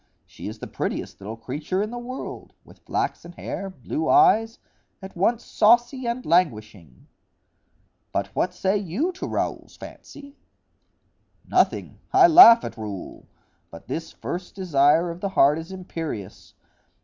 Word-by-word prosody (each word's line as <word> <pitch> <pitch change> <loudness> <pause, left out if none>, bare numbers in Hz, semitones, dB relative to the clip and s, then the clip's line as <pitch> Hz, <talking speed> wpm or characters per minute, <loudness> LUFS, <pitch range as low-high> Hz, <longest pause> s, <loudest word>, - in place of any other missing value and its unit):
She - - -10
is - - -7
the - - -8
prettiest - - -5
little 110 +3 -7
creature 150 - -3
in 215 - -5
the 240 - -6
world, 255 +2 -8
with - - -18
flaxen 170 - -4
hair, 195 +2 -6
blue 310 - -4
eyes,—at 225 - +1
once 220 +6 0
saucy 240 +3 +2
and 240 +2 -3
languishing." 110 - -1 1.1
"But - - -3
what - - 0
say 195 +2 0
you 205 - -2
to 365 - -7
Raoul's - - -4
fancy?" 285 0 -12 1.1
"Nothing—I 380 -1 +2
laugh 320 -9 +9
at - - -7
Raoul; 105 -4 -8 0.4
but 85 - -13
this 165 0 -5
first 180 +1 -7
desire 165 -2 +2
of 170 +1 -10
the 200 - -2
heart 150 -4 +3
is 165 +3 -9
imperious. 165 - -7
190 Hz, 135 wpm, -24 LUFS, 150-240 Hz, 1.1 s, laugh